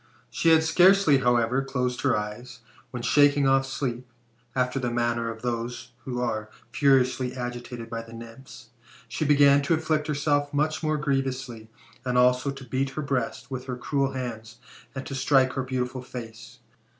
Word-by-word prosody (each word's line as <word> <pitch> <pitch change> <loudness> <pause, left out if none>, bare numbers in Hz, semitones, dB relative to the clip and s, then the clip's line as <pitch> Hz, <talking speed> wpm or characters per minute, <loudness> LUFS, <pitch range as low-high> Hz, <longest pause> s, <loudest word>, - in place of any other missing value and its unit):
She 165 - +2
had 160 0 +6
scarcely, 180 -3 +5
however, 120 +1 +2
closed 125 -2 -2
her 135 -5 +2
eyes, 120 +4 -6 0.3
when, 120 -1 -6
shaking 145 0 +4
off 135 0 +3
sleep, 125 -2 -4 0.4
after 130 +1 0
the 125 -2 -1
manner 120 -1 -1
of 115 0 -8
those 120 0 -4
who 125 -2 -3
are 110 -3 -2 0.2
furiously 130 0 +2
agitated 120 -1 -6
by 115 0 -5
the 115 0 -13
Nymphs, 115 +1 -12 0.4
she 135 +7 -3
began 140 -1 +5
to 150 +4 +2
afflict 155 -1 -1
herself 145 -1 0
much 155 0 0
more 155 -1 0
G:rievously, 135 -5 -2 0.3
and 125 -1 -1
also 125 +2 +3
to 135 -1 -7
beat 130 +3 -1
her 155 - -1
breast 135 0 -3
with 130 -1 -5
her 125 -1 -4
cruel 135 +2 -1
hands, 115 -3 -6 0.4
and 135 - -5
to - - -6
strike 130 -1 +3
her 135 - -1
beautiful 130 0 -3
face. 115 -3 -9
130 Hz, 165 wpm, -26 LUFS, 120-140 Hz, 0.4 s, had